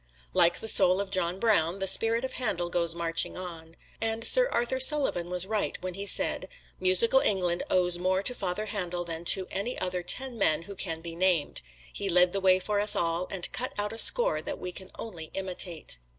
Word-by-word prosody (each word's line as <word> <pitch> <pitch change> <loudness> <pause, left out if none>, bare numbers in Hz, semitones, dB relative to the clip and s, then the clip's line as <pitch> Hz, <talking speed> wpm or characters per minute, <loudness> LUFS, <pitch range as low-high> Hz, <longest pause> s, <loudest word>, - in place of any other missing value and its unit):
Like 170 0 +2
the 225 - -6
soul 185 -3 +4
of 200 -1 -5
John 180 -1 -1
Brown, 195 -6 +1
the 195 - -3
spirit 225 +5 +4
of 260 - -7
Handel 175 -9 -2
goes 170 -1 0
marching 165 -1 0
on. 165 -3 -9 0.3
And 225 0 -2
Sir - - +6
Arthur 240 +2 -2
Sullivan 260 - +2
was 180 0 -1
right 210 +1 -3
when 185 0 -5
he 200 +2 -6
said, 190 - +3 0.3
"Musical 185 +8 +4
England 180 -6 -1
owes 180 -1 +2
more 185 +2 -1
to 250 - 0
Father 200 -2 -4
Handel 180 -4 -5
than 165 0 -7
to 190 +2 +3
any 205 +6 -4
other 180 -1 -4
ten 245 +7 +2
men 160 -4 +1
who 200 - -11
can 165 -4 -6
be 165 0 -9
named 180 -3 0 0.3
he 200 - -4
led 180 0 +3
the 195 - -3
way 185 -1 +3
for 205 +2 -3
us 210 +1 +5
all, 170 +1 -2
and 185 -2 -2
cut 255 - -4
out 205 +1 -3
a 225 - -1
score - - +5
that - - -7
we 180 - -7
can 190 +1 -13
only 175 -8 -9
imitate." 180 - -3
185 Hz, 210 wpm, -26 LUFS, 175-210 Hz, 0.3 s, Sir